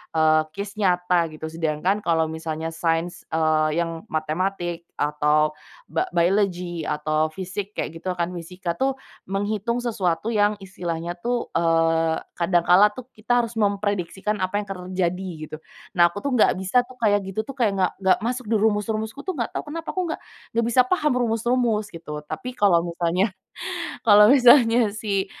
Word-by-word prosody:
eee, 155 0 +4
case 200 +1 -5
nyata 180 -3 +2
gitu. 155 +1 -7
Sedangkan 165 +5 0
kalau 160 -1 +2
misalnya 160 0 -4
sains, 165 +1 -1
eee, 155 0 +2
yang 165 -1 -7
matematik, 170 +2 -2
atau 150 +1 +2 0.3
ba 375 +1 -2
biology, 175 -1 +1
atau 155 +1 0
physic 190 +4 -6
kayak 165 +1 -4
gitu 180 -1 -3
kan, 170 +1 -1
fisika 175 0 -5
tuh 265 +6 -1 0.3
menghitung 205 +4 -1
sesuatu 215 -3 -1
yang 210 0 +2
istilahnya 175 -3 -5
tuh, 240 +2 -2
eee, 165 -1 +2 0.2
kadang 175 0 +1
kala 195 +4 +6
tuh 235 +4 -10
kita 240 +2 +1
harus 230 - -9
memprediksikan 205 -1 -1
apa 185 +2 0
yang 205 - -2
terjadi 185 -1 -3 0.2
gitu. 155 - -8 0.4
Nah 175 -2 +5
aku - - -11
tuh 280 - 0
nggak 230 -6 +4
bisa 190 +7 +2
tuh 250 +1 -14
kayak 205 -4 +2
gitu 215 +3 -3
tuh, 275 - -7
kayak 220 -7 0
nggak 185 -1 +2
nggak 190 -1 +4
masuk 250 -2 -3
di 225 - +3
rumus-rumusku 220 +4 -1
tuh 370 +1 -4
nggak 235 - -3
tahu - - -5
kenapa, 330 +2 -6
aku 370 - -1
nggak - - -3 0.4
nggak 230 - +3
bisa 240 +2 +4
paham 300 +1 +1
rumus-rumus 230 -2 0
gitu, 150 -3 -7
tapi 250 +10 -6
kalau 180 -5 +4
misalnya 175 +3 0 0.8
kalau 210 -1 +8
misalnya 240 -4 +6
si 205 -3 -1
190 Hz, 165 wpm, -23 LUFS, 165-220 Hz, 0.8 s, kalau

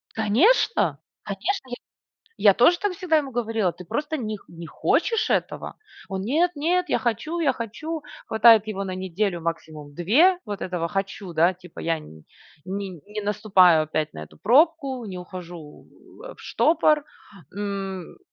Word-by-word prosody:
Конечно! 255 - +3 0.3
Конечно! 260 - -3
Я - - -2 0.6
я 205 - +6
тоже 245 - +4
так 405 0 -1
всегда 355 -3 +1
ему 285 -3 0
говорила: 225 -6 -1
"Ты 180 -1 -12
просто 300 - -2
них 215 -4 -5
не 170 0 -10
хочешь 455 - 0
этого!". - - -2 0.3
Он: 190 -1 -3
"Нет-нет, 340 - +1
я - - +2
хочу, 240 +9 -2
я 300 -4 +2
хочу!". 305 +8 -5 0.2
Хватает 220 -1 +6
его 195 -2 -3
на 185 -1 -4
неделю, 185 0 -2
максимум 155 -3 -6
2, 290 - +4
вот 205 -2 -6
этого 180 -2 -2
"хочу", 195 0 -4
да, 170 +3 +3
типа: 180 -2 -15
"Я 165 -1 0
не 80 - -14 0.4
не 200 +1 -6
наступаю 190 -6 +4
опять 155 0 -2
на 80 0 -7
эту - - -19
пробку, 270 - +2
не 185 - -7
ухожу, 175 -4 -10 0.4
э, - - -9
в - - -18
штопор". 305 -2 +2 0.5
М, 195 -3 -5
205 Hz, 150 wpm, -24 LUFS, 180-285 Hz, 0.6 s, я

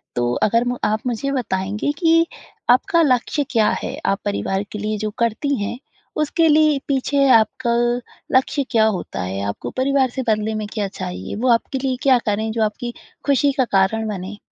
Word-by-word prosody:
तो 120 0 0
अगर 230 +3 +3
म 245 0 -1
आप 215 +1 +1
मुझे 250 +4 -2
बताएँगे 210 0 -1
कि 330 -1 +4 0.4
आपका 335 +8 +4
लक्ष्य 285 +1 +1
क्या 220 -4 +3
है? - - -4
आप 195 - +1
परिवार 200 -1 -1
के 210 - -5
लिए 215 0 -2
जो 215 +1 -2
करती 235 +5 0
हैं 240 - -4 0.4
उसके 325 +2 +2
लिए 305 -1 +4
पीछे 275 0 +2
आपका 235 +2 0 0.6
लक्ष्य 270 +2 +2
क्या 220 -1 +4
होता 195 - -2
है? 95 +2 -3
आपको 100 - -4
परिवार 265 0 +2
से 260 +2 -4
बदले 215 0 +1
में 215 -1 -3
क्या 210 -3 -1
चाहिए, 90 - -6
वो 245 +4 -1
आपके 250 +3 -1
लिए 260 -1 0
क्या 265 -2 +5
करें 220 +1 0
जो 225 -1 0
आपकी 235 +3 -3 0.3
खुशी 280 0 +3
का 260 - +3
कारण 220 +3 +2
बने? 200 0 -5
230 Hz, 180 wpm, -20 LUFS, 210-275 Hz, 0.6 s, क्या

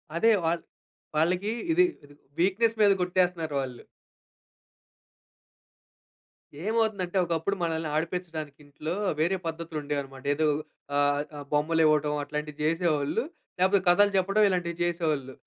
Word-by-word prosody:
అదే 225 +7 +4
వాళ్ళ్ 165 +1 0 0.5
వాళ్ళకి 180 +6 +1 0.2
ఇది 355 +3 +5 0.2
ఇ - - -18 0.3
వీక్‌‌‌నెస్స్ 210 +6 +2
మీద 205 -1 +7
కొట్టేస్తున్నారు 180 -4 0
వాళ్ళు. 130 -2 -7 2.8
ఏమవుతుందంటే, 210 -3 0
ఒకప్పుడు 170 +4 -1
మనల్ని 160 -1 -1
ఆడిపించడానికి 160 -3 -3
ఇంట్లో, 155 +4 -5 0.2
వేరే 175 +5 +2
పద్ధతులు 165 -1 -4
ఉండేవన్నమాట. 140 -2 -5
ఏదో 155 +1 +2 0.5
ఆహ్, 145 0 +3 0.2
ఆ - - -6
బొమ్మలివ్వటం 150 -1 +3
అట్లాంటివి 150 +1 -5
చేసేవాళ్ళు. 165 +3 +1 0.4
లేకపోతే 190 +1 +4
కథలు 205 +3 +5
చెప్పడం 195 +3 +3
ఇలాంటివి 175 -2 -1
చేసేవాళ్ళు. 155 -6 -1
165 Hz, 110 wpm, -27 LUFS, 150-185 Hz, 2.8 s, మీద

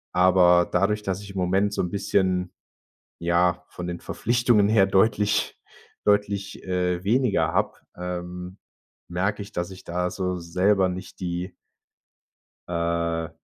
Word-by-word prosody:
Aber 90 -1 +5
dadurch, 105 +1 +1
dass 95 0 -2
ich 100 -1 -9
im 95 - -8
Moment 95 +3 +1
so - - 0
'n 90 - -2
bisschen 95 -2 0 0.7
ja, 85 +1 +2
von 90 0 -7
den 85 -1 -5
Verpflichtungen 120 -3 +2
her 105 -2 +5
deutlich 105 +1 +2 0.5
deutlich, 100 -1 0
äh, 90 -1 0
weniger 125 0 +2
habe, - - 0 0.2
ähm, 90 +1 -6 0.5
merke 95 +4 -1
ich, 100 +1 -9
dass 85 +2 -3
ich 95 0 -12
da 90 +1 -1
so 90 0 -2
selber 95 +3 +2
nicht 95 +1 -8
die 90 +1 -3 1.2
Äh, 85 -1 -1
90 Hz, 135 wpm, -25 LUFS, 90-100 Hz, 1.2 s, Aber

